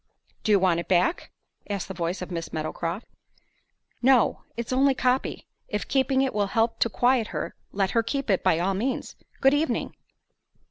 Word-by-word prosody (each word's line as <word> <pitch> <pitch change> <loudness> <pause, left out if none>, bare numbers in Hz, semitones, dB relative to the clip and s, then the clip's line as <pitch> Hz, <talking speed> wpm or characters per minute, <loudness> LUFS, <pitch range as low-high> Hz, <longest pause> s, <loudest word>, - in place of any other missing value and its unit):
"Do 215 - +1
you 205 - +7
want 180 -3 +2
it 170 - -5
back?" 185 - +1 0.4
asked 200 -2 -3
the 190 - -6
voice 175 +1 -3
of 180 - -8
Miss 165 -2 -4
Meadowcroft. 165 +5 -3 1.0
"No; 250 -2 +4 0.2
it's 235 +1 -3
only 270 +1 +4
a - - -16
copy. 255 +1 0 0.2
If 210 - -3
keeping 265 0 +2
it 265 - -1
will 205 -1 +1
help 225 +3 0
to 230 - +3
quiet 245 0 +2
her, - - -4 0.2
let 195 -1 0
her 230 - +3
keep 275 +4 -3
it 190 - +1
by 160 - +3
all 185 +3 +1
means. 245 +7 -2 0.3
Good 270 +1 +5
evening." 300 +2 0
215 Hz, 185 wpm, -26 LUFS, 185-260 Hz, 1.0 s, you